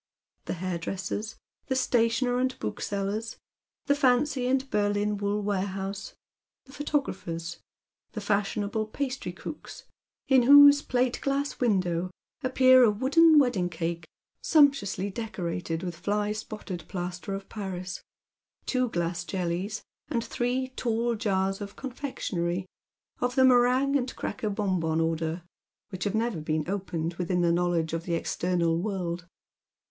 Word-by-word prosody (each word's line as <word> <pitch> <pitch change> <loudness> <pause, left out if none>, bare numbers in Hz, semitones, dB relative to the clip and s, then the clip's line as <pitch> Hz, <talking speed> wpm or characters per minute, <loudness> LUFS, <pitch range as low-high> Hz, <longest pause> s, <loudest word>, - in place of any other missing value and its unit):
The - - -2
hairdresser's 185 +4 -4
— - - -48
the 260 - 0
stationer 245 0 +2
and 255 0 0
book 105 - -4
seller's 205 +3 -3 0.2
— - - -66
the 285 - +4
fancy 260 -1 +2
and 265 +1 +1
Berlin 205 0 +1
wool 205 +1 -1
warehouse 195 0 -3 0.2
— - - -66
the 270 - -16
photo 295 0 0
grapher's 170 -7 -6 0.3
— - - -57
the 215 - -4
fashionable 205 +1 -1
pastrycook's, 270 +3 -5 0.4
in 265 -2 +6
whose 285 +2 +9
plate 250 -2 0
glass 280 0 -1
window 185 -7 +1 0.3
appear 255 -1 +6
a 235 - +6
wooden 295 +9 +5
wedding 245 -11 +3
cake, 165 -1 -4 0.3
sumptuously 275 - +3
decorated 180 -6 -4
with 175 -3 -4
fly 205 +4 0
spotted 210 -5 -6
plaster 180 +1 -4
of 195 0 -7
Paris, 190 -3 -5 0.6
two 255 -2 +1
glass 175 -2 -2
jellies, 180 +4 -3 0.2
and 235 -6 -1
three 255 +2 -1
tall 235 -2 -1
glass 220 - -7
jars 195 -1 0
of 200 0 -7
confectionery 190 -10 -3 0.5
of 245 0 -1
the 260 -1 +6
meringue 255 +2 +4
and 255 -2 0
cracker 215 - -3
bonbon 185 -6 0
order, 165 +1 -1 0.5
which 185 +1 -5
have 205 - 0
never 220 -6 0
been 155 0 -1
opened 175 -4 -2
within 180 0 0
the 170 -1 +3
knowledge 170 -2 +1
of 165 0 -3
the 170 - 0
external 170 0 0
world. 175 -4 -3
205 Hz, 140 wpm, -28 LUFS, 175-250 Hz, 0.6 s, whose